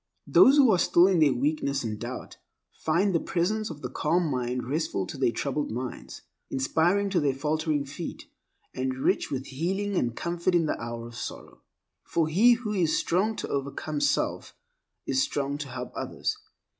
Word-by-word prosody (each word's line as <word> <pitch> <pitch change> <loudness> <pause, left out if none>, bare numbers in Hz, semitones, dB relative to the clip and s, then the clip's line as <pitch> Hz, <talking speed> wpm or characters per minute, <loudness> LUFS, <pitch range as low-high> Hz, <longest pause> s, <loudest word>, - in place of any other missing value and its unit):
Those 275 +3 +6
who 265 -5 +7
are 185 - +3
still 170 +1 +5
in 185 -3 +3
their 150 -3 +5
weakness 140 +1 0
and 110 -2 -4
doubt, - - -7 0.3
find 180 +5 +1
the 165 - +3
presence 210 +7 -1
of 150 -4 -9
the 125 - -3
calm 165 +3 +1
mind 125 -1 -2
restful 140 - -1
to - - -7
their 130 -3 +1
troubled 140 +5 -2
minds, 125 +3 -6 0.3
inspiring 175 +9 +1
to 185 - +3
their 140 -3 +1
faltering 150 0 0
feet, 150 +5 -7 0.5
and 130 0 -2
rich 130 - 0
with 135 -1 -3
healing 190 +8 -2
and 120 -8 0
comfort 175 +1 -1
in 170 -2 +3
the 150 - -2
hour 115 0 -5
of 120 - -10
sorrow. 120 - -8 0.4
For 165 -2 0
he 210 +10 +5
who 230 -3 -3
is 170 -6 +2
strong 205 +6 +1
to - - -5
overcome 140 +2 -3
self 145 0 0 0.5
is 130 -1 +1
strong 140 +1 -1
to 150 - -4
help 130 0 -6
others. - - -2
150 Hz, 180 wpm, -27 LUFS, 130-175 Hz, 0.5 s, who